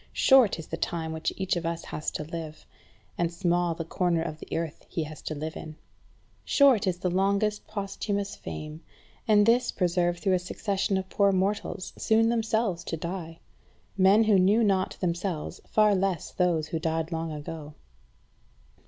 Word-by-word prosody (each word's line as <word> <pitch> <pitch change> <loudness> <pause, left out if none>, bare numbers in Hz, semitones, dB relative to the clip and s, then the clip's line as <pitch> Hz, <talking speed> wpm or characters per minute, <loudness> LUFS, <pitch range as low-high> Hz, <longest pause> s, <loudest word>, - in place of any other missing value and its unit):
Short 260 -9 +5
is 160 - -7
the 165 - -5
time 165 -2 -2
which 160 0 -2
each 190 -1 0
of 175 - -2
us 165 0 -3
has 155 - -3
to - - -5
live, 155 -1 -7 0.5
and 170 -1 +1
small 175 -1 0
the 165 - -5
corner 170 -1 0
of 155 -2 -5
the - - -4
earth 165 -2 -4
he 165 - -2
has 155 0 -9
to 155 - -4
live 155 +2 -5
in. 155 -1 -8 0.7
Short 265 -8 +4
is 180 -1 0
the 180 0 -1
longest 200 +3 +1
posthumous 200 -1 -3
fame, 155 +1 -7 0.5
and 210 -2 +5
this 240 +2 +3
preserved 175 -1 +1
through 190 0 +1
a 185 - +3
succession 195 +2 -1
of 190 0 -3
poor 200 +1 +3
mortals, 195 0 -1
soon 225 +1 +3
themselves 220 -5 0
to 165 - -3
die; 165 0 -6 0.5
men 195 +3 +5
who 210 -3 +4
knew 205 +5 +4
not 190 -3 +1
themselves, 175 -2 -2
far 215 -1 +4
less 190 -3 -1
those 170 -4 +1
who 165 - -2
died 160 0 -1
long 165 0 -3
ago. 150 0 -7
180 Hz, 170 wpm, -27 LUFS, 165-200 Hz, 0.7 s, Short